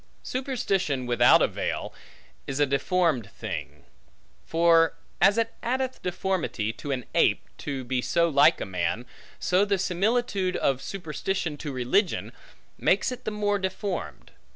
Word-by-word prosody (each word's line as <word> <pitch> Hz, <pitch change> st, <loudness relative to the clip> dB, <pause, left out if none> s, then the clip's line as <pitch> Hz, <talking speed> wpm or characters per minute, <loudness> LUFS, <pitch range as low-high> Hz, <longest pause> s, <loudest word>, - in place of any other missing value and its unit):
Superstition, 195 Hz, -, -1 dB
without 120 Hz, -1 st, +5 dB
a -, -, +4 dB
veil, -, -, -3 dB, 0.5 s
is 135 Hz, +1 st, -3 dB
a 145 Hz, -, +5 dB
deformed 140 Hz, -, +1 dB
thing; -, -, -7 dB, 0.6 s
for, 165 Hz, 0 st, +4 dB, 0.3 s
as 200 Hz, +3 st, +5 dB
it 230 Hz, 0 st, 0 dB
addeth 260 Hz, +1 st, -2 dB
deformity 180 Hz, -, -2 dB
to 145 Hz, -, -8 dB
an 125 Hz, -3 st, -2 dB
ape, -, -, +3 dB
to 135 Hz, -2 st, -4 dB
be 125 Hz, 0 st, -1 dB
so 170 Hz, +6 st, +2 dB
like 145 Hz, -3 st, +5 dB
a -, -, -3 dB
man, 95 Hz, +5 st, -2 dB, 0.3 s
so 185 Hz, +2 st, +2 dB
the 200 Hz, -1 st, +1 dB
similitude 195 Hz, +1 st, 0 dB
of 135 Hz, -1 st, +1 dB
superstition 175 Hz, -2 st, -3 dB
to 145 Hz, 0 st, -5 dB
religion, 130 Hz, -, 0 dB, 0.5 s
makes -, -, +2 dB
it 250 Hz, 0 st, -8 dB
the -, -, 0 dB
more 205 Hz, -1 st, 0 dB
deformed. 190 Hz, -1 st, -4 dB
175 Hz, 140 wpm, -26 LUFS, 135-200 Hz, 0.6 s, without